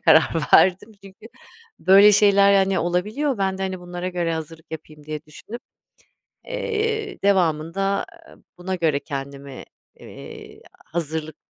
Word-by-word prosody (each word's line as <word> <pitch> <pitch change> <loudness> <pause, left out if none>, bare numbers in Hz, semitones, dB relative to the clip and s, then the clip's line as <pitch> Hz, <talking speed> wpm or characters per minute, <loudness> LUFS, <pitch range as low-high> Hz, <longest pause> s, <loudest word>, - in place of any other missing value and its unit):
karar 160 - +5 0.3
verdim 190 +4 +4
çünkü 195 +3 -14 0.5
böyle 200 +2 +7
şeyler, 200 -1 +5
hani, 195 -1 +2
olabiliyor. 210 - -1
Ben 190 -1 -1
de, 195 - -3
hani, 190 -1 -3
bunlara 175 0 -5
göre 175 -2 -2
hazırlık 160 0 -8
yapayım 155 -1 -10
diye 155 0 -6
düşünüp, 215 +10 -10 0.9
eee, 445 -3 -3
devamında, 175 -2 +1
aaa, 200 0 -4 0.2
buna 185 +1 -4
göre 160 -5 0
kendimi, 140 -2 -7 0.3
eee, - - -12 0.3
hazırlık, 160 -2 -4
180 Hz, 125 wpm, -22 LUFS, 160-200 Hz, 0.9 s, böyle